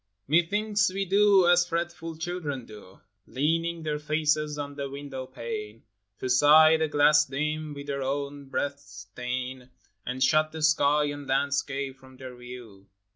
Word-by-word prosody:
TV/TETH1NKS 195 +6 +1
we 195 0 -1
do 195 -1 +4
as 175 0 +4
fretful 170 -1 -4
children 160 -7 -4
do, 105 -4 -14 0.3
Leaning 165 +4 -1
their 150 -1 -2
faces 150 0 0
on 145 -1 -5
the 140 -1 -5
window 135 -2 -7
pane 115 -4 -7 0.4
To - - -2
sigh 150 +5 +6
the 160 0 0
glass 150 +1 +4
dim 150 +2 -3
with 140 0 -8
their 140 -1 -3
own 140 +1 -3
breaths' 135 -8 -5
stain, 125 +1 -5 0.3
And 130 +2 -2
shut 155 0 +3
the 160 -1 -5
sky 150 -1 +3
and 145 -1 -4
landscape 140 0 -1
from 130 -1 -17
their 130 -1 -9
view. 120 -5 -12
145 Hz, 150 wpm, -27 LUFS, 130-155 Hz, 0.4 s, sigh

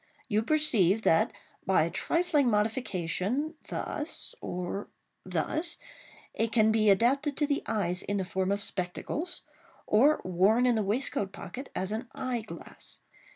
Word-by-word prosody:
You 215 -3 +2
perceive 225 - +3
that, 165 - +4 0.3
by 190 -4 +3
a 165 - -2
trifling 315 -6 +2
modification 210 - 0
thus—or 195 - -4 0.4
thus—it 315 -8 -4
can 220 -2 +4
be 215 -1 +4
adapted 265 +8 +3
to 300 - +2
the 285 -1 0
eyes 190 -5 0
in 205 - -2
the 190 - -1
form 190 +1 -1
of 200 0 0
spectacles, 240 - -3 0.4
or 275 +9 +5
worn 195 +7 +3
in 250 - +4
the 220 - +1
waistcoat 205 -2 0
pocket 255 +6 -8
as 190 +2 -1
an 225 +4 -3
eye 255 -3 -2
glass. 215 - -9
220 Hz, 135 wpm, -29 LUFS, 195-270 Hz, 0.4 s, or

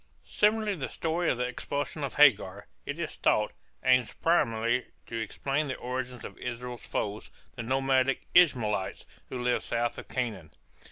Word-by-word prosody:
Similarly 210 0 +2
the 150 -8 -4
story 165 +1 0
of - - +1
the 125 - 0
expulsion 145 +4 -3
of 140 - -3
Hagar, 100 -9 +5 0.2
it - - -3
is - - -4
thought, 105 0 +2 0.3
aims 125 -2 +4
primarily 120 -7 +1 0.2
to 115 - -4
explain 140 +7 -1
the 130 - -2
origin 125 -1 -4
of - - -9
Israel's 125 0 -6
foes, 105 +1 -3 0.3
the 120 - -4
nomadic 135 +2 +1
Ishmaelites, 115 - +3 0.2
who 125 -1 -4
lived 125 0 +1
south 120 0 -1
of - - -10
Canaan. 105 -12 -4
125 Hz, 155 wpm, -29 LUFS, 115-140 Hz, 0.3 s, Hagar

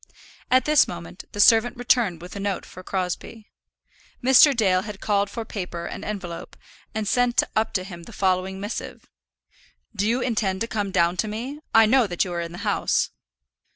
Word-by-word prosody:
At 255 0 +4
this 300 -1 +5
moment 175 +1 -8
the 205 - -8
servant 225 +3 +5
returned 235 -8 +1
with 180 - -9
a - - -5
note 200 -1 -2
for 185 - -11
Crosbie. 190 +4 -4 0.7
Mr. 265 +1 +6
Dale 185 -5 +3
had 205 0 -8
called 200 -1 +1
for 225 +2 -5
paper 180 -5 -5
and - - -6
envelope, 190 -5 -6 0.4
and 215 -1 -2
sent 245 +2 +3
up 220 +1 +1
to 185 - 0
him 180 -3 -9
the - - -11
following 190 -1 0
missive: 205 +3 -6 0.9
"Do 205 0 0
you 235 +3 +1
intend 210 -6 -1
to 230 - 0
come 205 -3 -2
down 175 -1 +2
to 215 - 0
me? 245 +8 -5 0.2
I 225 0 +8
know 245 +1 +4
that 175 -1 0
you 180 - -5
are 170 - -2
in 170 0 -5
the 175 - -8
house." - - +1
205 Hz, 190 wpm, -24 LUFS, 185-230 Hz, 0.9 s, I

